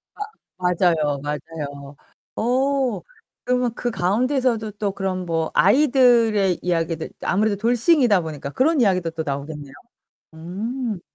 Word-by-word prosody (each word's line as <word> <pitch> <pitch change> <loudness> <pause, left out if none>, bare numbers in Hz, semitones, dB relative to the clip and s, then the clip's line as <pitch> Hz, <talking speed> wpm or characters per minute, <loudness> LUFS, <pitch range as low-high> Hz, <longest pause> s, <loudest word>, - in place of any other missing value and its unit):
아 - - -10 0.4
맞아요, 170 -5 +1
맞아요. 145 -1 -6 0.4
어 260 0 0 0.4
그러면 250 -2 0
그 245 - -2
가운데서도 230 +3 0
또 205 -1 -3
그런 190 -2 -3
뭐 165 -2 -1
아이들의 235 - +4
이야기들 165 -2 -1
아무래도 205 +2 +1
돌싱이다 240 - +3
보니까 150 -4 -6
그런 285 - +2
이야기도 185 -6 +2
또 160 0 -4
나오겠네요. 140 0 -5 0.6
음. 210 +6 -4
195 Hz, 285 characters per minute, -22 LUFS, 165-245 Hz, 0.6 s, 아이들의